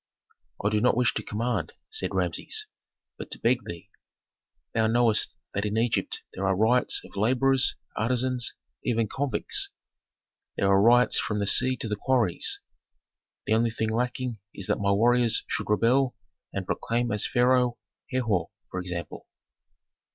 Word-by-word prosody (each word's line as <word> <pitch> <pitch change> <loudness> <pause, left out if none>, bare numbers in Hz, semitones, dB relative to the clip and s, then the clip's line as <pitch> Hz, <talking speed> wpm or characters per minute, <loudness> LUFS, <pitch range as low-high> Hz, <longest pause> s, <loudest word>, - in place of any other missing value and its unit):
"I - - +4
do 105 0 +1
not 125 0 +3
wish 125 -1 +3
to - - -2
command," 115 +4 -2 0.2
said 440 - -2
Rameses, 435 -1 -1 0.5
"but - - -7
to - - -5
beg 125 +2 +1
thee. 85 -1 -8 0.8
Thou 110 -1 +2
knowest 115 -1 +2 0.2
that 100 - -1
in 105 +1 -1
Egypt 115 0 0
there 95 - -5
are 95 - +2
riots 115 +5 +2
of - - -15
laborers, 130 +5 +2 0.2
artisans, 125 +1 0 0.3
even 115 -2 +1
convicts. 140 +5 -1 0.9
There 100 - +2
are 95 0 +5
riots 120 +3 +5
from 105 - -1
the 100 - 0
sea 130 +5 +3
to 115 - -4
the 105 - -1
quarries. 115 -4 +1 0.9
The - - +1
only 115 +1 +3
thing 110 0 -2
lacking 125 0 -2 0.2
is 100 - -5
that - - 0
my 100 -1 +1
warriors 120 +2 +3
should - - -3
rebel 125 +5 +3 0.4
and 100 -1 -4
proclaim 120 +4 -1
as 105 - 0
pharaoh 125 -1 +3 0.3
Herhor, 110 -10 0 0.2
for 90 - -3
example." 90 -3 -6
115 Hz, 150 wpm, -27 LUFS, 105-125 Hz, 0.9 s, are